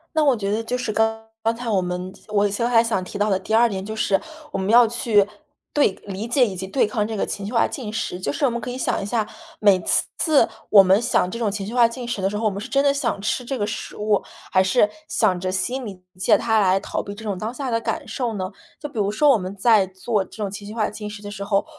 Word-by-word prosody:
那 315 Hz, -, +4 dB
我 275 Hz, -4 st, +4 dB
觉 200 Hz, -2 st, -2 dB
得 220 Hz, +2 st, 0 dB
就 245 Hz, +3 st, -2 dB
是， 250 Hz, -3 st, -2 dB
刚 220 Hz, +1 st, 0 dB, 0.2 s
刚 225 Hz, +1 st, +1 dB
才 240 Hz, -1 st, -5 dB
我 195 Hz, -3 st, +2 dB
们 180 Hz, +1 st, -4 dB
我 205 Hz, -1 st, +2 dB
其 200 Hz, -, -3 dB
实 235 Hz, -, 0 dB
还 235 Hz, -1 st, +4 dB
想 225 Hz, -5 st, 0 dB
提 190 Hz, +3 st, -7 dB
到 210 Hz, +1 st, +1 dB
的 190 Hz, -, +2 dB
第 220 Hz, -, -5 dB
2 230 Hz, +1 st, +5 dB
点 190 Hz, -1 st, -4 dB
就 220 Hz, +1 st, -5 dB
是， 195 Hz, -3 st, +2 dB, 0.3 s
我 -, -, -2 dB
们 190 Hz, +1 st, -2 dB
要 240 Hz, +1 st, +7 dB
去 220 Hz, -3 st, +2 dB, 0.5 s
对 290 Hz, -8 st, +4 dB
理 200 Hz, +3 st, -5 dB
解 245 Hz, +1 st, +4 dB
以 200 Hz, -, -4 dB
及 190 Hz, +1 st, -5 dB
对 260 Hz, +4 st, +2 dB
抗 210 Hz, -1 st, -1 dB
这 225 Hz, -, -4 dB
个 200 Hz, -, 0 dB
情 200 Hz, -, -5 dB
绪 215 Hz, -, -5 dB
化 230 Hz, -, +4 dB
进 235 Hz, -6 st, -6 dB
食， 185 Hz, -5 st, -3 dB
就 -, -, -2 dB
是 295 Hz, -, -4 dB
我 -, -, +4 dB
们 235 Hz, 0 st, -3 dB
可 250 Hz, -, -6 dB
以 245 Hz, -, -4 dB
想 260 Hz, -, -1 dB
一 195 Hz, -, -4 dB
下， 220 Hz, 0 st, 0 dB, 0.3 s
每 200 Hz, -3 st, +5 dB
次 -, -, +1 dB
次 310 Hz, -4 st, +4 dB, 0.2 s
我 200 Hz, -2 st, +9 dB
们 190 Hz, +3 st, +4 dB
想 230 Hz, -6 st, +1 dB
这 230 Hz, -, -5 dB
种 225 Hz, -3 st, +1 dB
情 200 Hz, -1 st, -4 dB
绪 220 Hz, -, -6 dB
化 240 Hz, -2 st, +5 dB
进 240 Hz, +1 st, -7 dB
食 225 Hz, -5 st, -3 dB
的 190 Hz, -, +1 dB
时 210 Hz, -, -3 dB
候， 225 Hz, -, -4 dB
我 -, -, +4 dB
们 200 Hz, 0 st, -5 dB
是 245 Hz, -, -6 dB
真 275 Hz, +3 st, +2 dB
的 280 Hz, -1 st, +4 dB
想 250 Hz, -7 st, -1 dB
吃 235 Hz, +4 st, -1 dB
这 265 Hz, +2 st, -3 dB
个 205 Hz, -, 0 dB
食 210 Hz, -, -5 dB
物， 210 Hz, -1 st, +1 dB, 0.3 s
还 185 Hz, -, +5 dB
是， 205 Hz, +3 st, +3 dB, 0.2 s
想 190 Hz, -5 st, +1 dB
着 185 Hz, +1 st, -2 dB
心 250 Hz, +7 st, -2 dB
里 195 Hz, -5 st, -7 dB, 0.2 s
借 190 Hz, -, +4 dB
它 220 Hz, -1 st, +2 dB
来 190 Hz, -1 st, +3 dB
逃 -, -, -3 dB
避 200 Hz, -, -7 dB
这 220 Hz, -, -10 dB
种 205 Hz, -3 st, -1 dB
当 215 Hz, +3 st, -3 dB
下 255 Hz, 0 st, -4 dB
的 230 Hz, 0 st, +1 dB
感 -, -, -3 dB
受 240 Hz, -4 st, -2 dB
呢？ 185 Hz, 0 st, -3 dB, 0.3 s
就 295 Hz, -, -5 dB
比 240 Hz, -7 st, -6 dB
如 200 Hz, 0 st, +1 dB
说 290 Hz, +7 st, +3 dB
我 240 Hz, -, +4 dB
们 185 Hz, +1 st, -6 dB
在 205 Hz, -2 st, +4 dB
做 190 Hz, +2 st, -1 dB
这 190 Hz, -, -15 dB
种 195 Hz, -, -3 dB
情 200 Hz, +1 st, -8 dB
绪 215 Hz, -, -8 dB
化 215 Hz, -2 st, +1 dB
进 210 Hz, 0 st, -6 dB
食 210 Hz, 0 st, -9 dB
的 205 Hz, -, -6 dB
时 200 Hz, -1 st, -6 dB
候， 200 Hz, -1 st, +1 dB
215 Hz, 315 characters per minute, -22 LUFS, 195-235 Hz, 0.5 s, 我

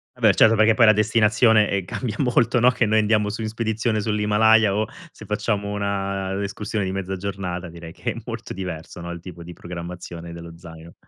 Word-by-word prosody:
Vabbè -, -, +4 dB
certo 115 Hz, 0 st, +5 dB
perché 110 Hz, +1 st, +5 dB
poi 115 Hz, +1 st, +5 dB
la -, -, +9 dB
destinazione, 105 Hz, 0 st, +3 dB
ehm, 100 Hz, -2 st, -1 dB
cambia 110 Hz, +2 st, -4 dB
molto, 125 Hz, -1 st, +2 dB
no, 120 Hz, +2 st, +6 dB
che 125 Hz, -, +1 dB
noi 110 Hz, +1 st, +3 dB
andiamo 105 Hz, -1 st, +2 dB
su 110 Hz, +2 st, -5 dB
in -, -, -2 dB
spedizione 110 Hz, 0 st, -1 dB
sull'Himalaya 105 Hz, 0 st, +3 dB
o 110 Hz, +1 st, +1 dB, 0.2 s
se -, -, -14 dB
facciamo 105 Hz, -1 st, -2 dB
una 100 Hz, -1 st, -2 dB
escursione 105 Hz, +1 st, -3 dB
di 95 Hz, -, -2 dB
mezza 95 Hz, 0 st, -3 dB
giornata 90 Hz, -2 st, -5 dB
direi 85 Hz, 0 st, -10 dB
che -, -, -3 dB
è -, -, -8 dB
molto -, -, -6 dB
diverso 90 Hz, -3 st, -7 dB
no, 85 Hz, 0 st, -7 dB
il 85 Hz, -1 st, -7 dB
tipo 85 Hz, -1 st, -10 dB
di 85 Hz, +1 st, -9 dB
programmazione 85 Hz, -1 st, -8 dB
dello 85 Hz, 0 st, -10 dB
zaino. 85 Hz, -1 st, -12 dB
100 Hz, 200 wpm, -22 LUFS, 90-110 Hz, 0.2 s, la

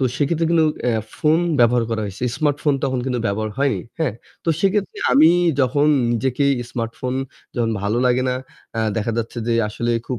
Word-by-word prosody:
তো -, -, +2 dB
সেক্ষেত্রে 160 Hz, +3 st, +1 dB
কিন্তু 165 Hz, -2 st, +4 dB, 0.2 s
আ -, -, +1 dB, 0.3 s
ফোন 155 Hz, 0 st, +3 dB, 0.2 s
ব্যবহার 120 Hz, 0 st, +4 dB
করা 110 Hz, -1 st, -1 dB
হইছে। 100 Hz, +5 st, -5 dB
স্মার্টফোন 145 Hz, -1 st, +1 dB
তখন 130 Hz, -1 st, 0 dB
কিন্তু 125 Hz, -2 st, -1 dB
ব্যবহার 110 Hz, +2 st, -1 dB
হয়নি। 140 Hz, -1 st, +1 dB, 0.2 s
হ্যাঁ? 155 Hz, -10 st, 0 dB, 0.3 s
তো -, -, -2 dB
সেক্ষেত্রে 195 Hz, 0 st, 0 dB
আমি 155 Hz, +3 st, +7 dB, 0.3 s
যখন 140 Hz, +3 st, +2 dB, 0.3 s
নিজেকেই 130 Hz, +4 st, +1 dB, 0.2 s
স্মার্টফোন 120 Hz, +2 st, -3 dB, 0.4 s
যখন 115 Hz, -2 st, +1 dB
ভালো 105 Hz, +3 st, 0 dB
লাগে 125 Hz, +1 st, +2 dB
না, 125 Hz, -, +1 dB, 0.4 s
আ -, -, +2 dB, 0.2 s
দেখা 115 Hz, +1 st, -1 dB
যাচ্ছে 115 Hz, +1 st, -4 dB
যে 115 Hz, -, +2 dB
আসলে 120 Hz, +3 st, -2 dB, 0.2 s
খুব 125 Hz, -, -3 dB
125 Hz, 175 wpm, -21 LUFS, 115-150 Hz, 0.4 s, আমি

